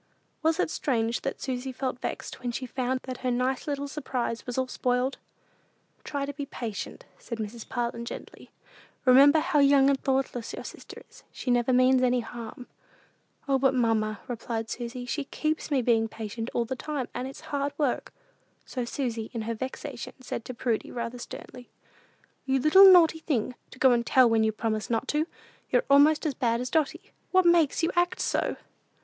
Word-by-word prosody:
Was 320 0 +2
it - - +1
strange 230 -3 0
that 275 - -3
Susy 260 0 -3
felt 255 -1 -3
vexed - - -5
when 245 -1 -2
she 255 +2 -4
found 255 +1 -2
that 255 -1 -6
her 255 - -1
nice 250 +3 0
little 285 -1 -2
surprise 255 -5 -3
was 245 - -4
all 260 - +2
spoiled? 250 +1 -1 0.8
"Try 280 -1 -3
to 285 - -5
be 285 0 -5
patient," 225 -7 -6
said 230 - -6
Mrs. 220 +1 -6
Parlin, 235 -1 -2
gently. - - -9 0.6
"Remember 275 +4 +7
how 315 -1 +2
young 280 -1 +6
and 270 - -1
thoughtless 260 -3 -1
your - - -7
sister - - -10
is. - - -18
She 250 - -3
never 245 +1 +2
means 255 +1 +5
any 250 -1 +3
harm." 235 +1 -8 0.8
"O, 270 -1 +2
but, 270 0 +3
mamma," 220 -3 +1
replied 230 -2 -4
Susy, 245 +1 -5
"she 280 +4 -3
keeps 310 +3 -2
me 275 -4 +1
being 225 -1 +3
patient 225 +1 -5
all 235 - +1
the 235 - -3
whole 305 - -4
time, 260 -4 -1
and 250 +1 -3
it's 270 - -10
hard 285 0 0
work." 285 -5 -1 0.5
So 250 - -4
Susy, 235 -3 -3
in 225 - -2
her 230 +1 -2
vexation, 260 +2 -6
said 250 -2 -5
to 255 - -6
Prudy, 230 -2 -1
rather 235 0 -4
sternly, 245 +1 -9 0.8
"You 265 0 +2
little 380 +8 +8
naughty 330 -3 +6
thing, 255 -7 -1 0.2
to - - -14
go 260 0 +5
and 240 -1 +3
tell 255 +1 +5
when 225 -1 +3
you 220 - +2
promised 215 0 -2
not 235 +3 0
to! 305 +2 +1 0.4
You're - - +2
almost 300 +3 +6
as 300 - +1
bad 235 -3 0
as 250 0 -4
Dotty. 325 +5 -1 0.2
What 370 -1 +4
makes 340 -2 +4
you 330 - +2
act 350 0 +1
so?" - - 0
255 Hz, 190 wpm, -27 LUFS, 235-280 Hz, 0.8 s, little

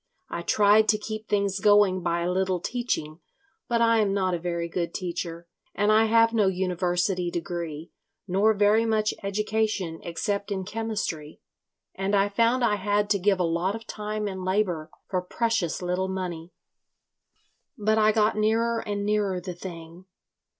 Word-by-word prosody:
I - - -3
tried 210 +1 +4
to 215 - +4
keep 215 +1 -6
things 200 -1 0
going 205 -2 +4
by 170 0 -1
a 175 +1 0
little 185 0 0
teaching, 175 -8 -3 0.5
but 235 -1 +1
I 230 -1 +4
am 200 -2 +1
not 185 -2 +1
a 175 - -1
very 170 0 -2
good 170 0 -3
teacher, 170 -1 -4 0.3
and 205 +1 +2
I 220 +1 +5
have 230 +1 +4
no 215 -4 +3
university 180 -1 0
degree, 170 -2 -5 0.4
nor 205 +4 +3
very 210 +2 +4
much 215 -1 +1
education 210 -4 -1
except 200 +4 -3
in 190 -2 -2
chemistry, 210 -8 -4 0.5
and 195 +2 -1
I 200 0 +3
found 230 +4 +2
I 210 -3 +2
had 205 +1 0
to 200 - +3
give 195 0 +2
a - - +2
lot 170 +4 0
of 225 0 -8
time 210 -1 -4
and 190 -2 -5
labour 185 -4 0 0.2
for 185 -2 -1
precious 200 -2 -1
little 180 +1 -1
money. 180 -3 -5 1.3
But 215 +1 +2
I 215 0 +5
got 215 0 +2
nearer 225 +2 +1
and 205 -2 -3
nearer 205 -3 0
the 180 0 -6
thing. 170 0 -10
200 Hz, 165 wpm, -26 LUFS, 180-215 Hz, 1.3 s, I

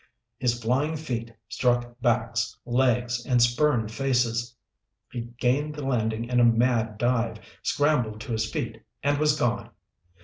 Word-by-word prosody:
His 120 -1 +1
flying 130 +7 0
feet 120 -7 -4 0.2
struck 120 0 0
backs, 115 -3 0
legs, 120 -1 +1
and 125 0 +2
spurned 120 -2 +2
faces. 120 -2 0 0.6
He 120 - -4 0.2
gained 145 +5 +1
the 150 -2 -5
landing 115 -3 0
in 125 0 +1
a - - +6
mad 115 -2 +3
dive, 115 -1 +1 0.2
scrambled 125 -8 +1
to 125 - -6
his 110 -1 -1
feet, - - -4 0.2
and 145 0 +2
was 150 0 +3
gone. 120 -5 0
120 Hz, 140 wpm, -26 LUFS, 115-130 Hz, 0.6 s, a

